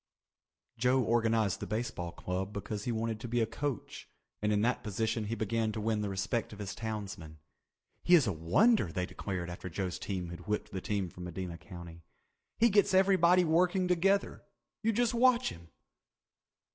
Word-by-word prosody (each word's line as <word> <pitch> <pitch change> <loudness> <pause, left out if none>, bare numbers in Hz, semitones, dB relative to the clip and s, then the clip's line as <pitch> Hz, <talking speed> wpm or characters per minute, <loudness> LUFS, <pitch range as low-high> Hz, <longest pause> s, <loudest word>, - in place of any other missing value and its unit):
Joe 125 +2 +3
organized 115 -3 +2
the - - -5
baseball 110 -6 -3
club 95 +3 -4
because 105 0 -5
he 120 - 0
wanted 115 -1 -2
to 120 - -6
be 120 +1 0
a 115 - +3
coach 135 +1 -5 0.3
and 105 0 +1
in 105 0 +2
that 125 +2 +1
position 110 +1 -1
he 110 +2 -2
began 110 +1 0
to 110 - -3
win 110 0 0
the 105 - -2
respect 100 +4 -2
of 105 - -9
his 100 -1 -5
townsmen. 105 -8 -6 0.6
"He 175 - +6
is 155 -6 +5
a 100 - 0
wonder," 85 - +3
they 90 +1 -1
declared 90 -2 -4
after 90 +1 -7
Joe's 90 +1 -3
team 90 -4 -4
had 85 +4 -9
whipped 105 0 -2
the 95 - -4
team 100 -2 -1
from 90 - -8
Medina 90 -1 -5
County. 85 -3 -10 0.6
"He 235 +1 +5
gets 200 -1 +4
everybody 185 -2 +5
working 180 +3 +2
together. 190 +3 +1 0.4
You 225 - +2
just 240 +2 +1
watch 250 +1 +4
him." 85 0 -11
110 Hz, 180 wpm, -32 LUFS, 95-145 Hz, 0.6 s, He